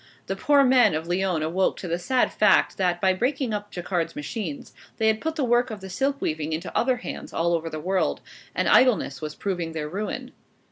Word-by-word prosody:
The -, -, -3 dB
poor 285 Hz, -2 st, +4 dB
men 255 Hz, -, +5 dB
of 160 Hz, +2 st, -3 dB
Lyons 180 Hz, -2 st, 0 dB
awoke 180 Hz, +4 st, 0 dB
to 185 Hz, -, -6 dB
the 170 Hz, +1 st, -1 dB
sad 250 Hz, +8 st, +1 dB
fact, 210 Hz, -, +3 dB
that 180 Hz, -2 st, +1 dB
by 190 Hz, 0 st, +3 dB
breaking 250 Hz, +3 st, -1 dB
up 205 Hz, 0 st, -4 dB
Jacquard's 175 Hz, -2 st, -2 dB
machines, 150 Hz, +1 st, -5 dB, 0.2 s
they 220 Hz, -, 0 dB
had 220 Hz, 0 st, +2 dB
put 320 Hz, 0 st, -2 dB
the 300 Hz, -, -1 dB
work 240 Hz, 0 st, +2 dB
of 210 Hz, -3 st, -7 dB
silk 275 Hz, +7 st, 0 dB
weaving 155 Hz, -, -2 dB
into 160 Hz, -, -5 dB
other 255 Hz, 0 st, +2 dB
hands 245 Hz, -, -7 dB
all 170 Hz, +1 st, +1 dB
over 165 Hz, -1 st, -1 dB
the 155 Hz, -, -5 dB
world; 185 Hz, +4 st, 0 dB, 0.4 s
and -, -, +1 dB
idleness 220 Hz, -, +4 dB
was 150 Hz, -1 st, -5 dB
proving 175 Hz, -5 st, -3 dB
their 155 Hz, -2 st, -3 dB
ruin. 200 Hz, +7 st, -4 dB
190 Hz, 205 wpm, -25 LUFS, 165-240 Hz, 0.4 s, men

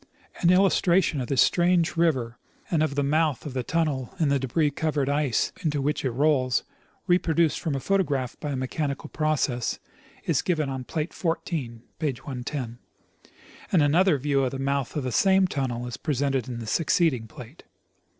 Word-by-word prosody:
An 170 Hz, -, +3 dB
illustration 180 Hz, -4 st, +3 dB
of 125 Hz, -, -4 dB
this 135 Hz, 0 st, +4 dB
strange 175 Hz, -1 st, +2 dB
river 130 Hz, -8 st, 0 dB, 0.3 s
and 165 Hz, -3 st, +2 dB
of 155 Hz, -3 st, 0 dB
the 145 Hz, -, +1 dB
mouth 150 Hz, -1 st, +1 dB
of 145 Hz, -, -5 dB
the 130 Hz, -, -1 dB
tunnel 150 Hz, 0 st, -1 dB
in 155 Hz, -3 st, +2 dB
the 140 Hz, 0 st, +2 dB
debris 145 Hz, +4 st, +1 dB
covered 150 Hz, -2 st, -1 dB
ice 145 Hz, -5 st, +1 dB
into 150 Hz, -3 st, 0 dB
which 145 Hz, +2 st, -1 dB
it 130 Hz, -, +1 dB
rolls, 130 Hz, 0 st, +2 dB, 0.4 s
reproduced 170 Hz, -3 st, +2 dB
from 155 Hz, -4 st, -2 dB
a -, -, -1 dB
photograph 145 Hz, -8 st, 0 dB
by 150 Hz, -, -4 dB
a -, -, -2 dB
mechanical 140 Hz, +2 st, -3 dB
process, 150 Hz, -6 st, 0 dB, 0.5 s
is -, -, +1 dB
given 155 Hz, -6 st, 0 dB
on 130 Hz, -1 st, -5 dB
plate 155 Hz, +4 st, -3 dB
14 150 Hz, -9 st, -3 dB, 0.2 s
(page 145 Hz, -6 st, -2 dB
110), 125 Hz, -2 st, -5 dB, 0.9 s
and 170 Hz, -6 st, +4 dB
another 165 Hz, +3 st, +4 dB
view 140 Hz, 0 st, +1 dB
of 130 Hz, -, +1 dB
the 135 Hz, -, -5 dB
mouth 135 Hz, -1 st, -1 dB
of 150 Hz, -, -1 dB
the 130 Hz, -, -2 dB
same 190 Hz, -, +4 dB
tunnel 130 Hz, -7 st, -2 dB
is 120 Hz, -, -6 dB
presented 135 Hz, -3 st, -1 dB
in 125 Hz, -2 st, -5 dB
the 115 Hz, -, -6 dB
succeeding 145 Hz, -, +1 dB
plate. 125 Hz, +3 st, -12 dB
145 Hz, 175 wpm, -26 LUFS, 130-160 Hz, 0.9 s, this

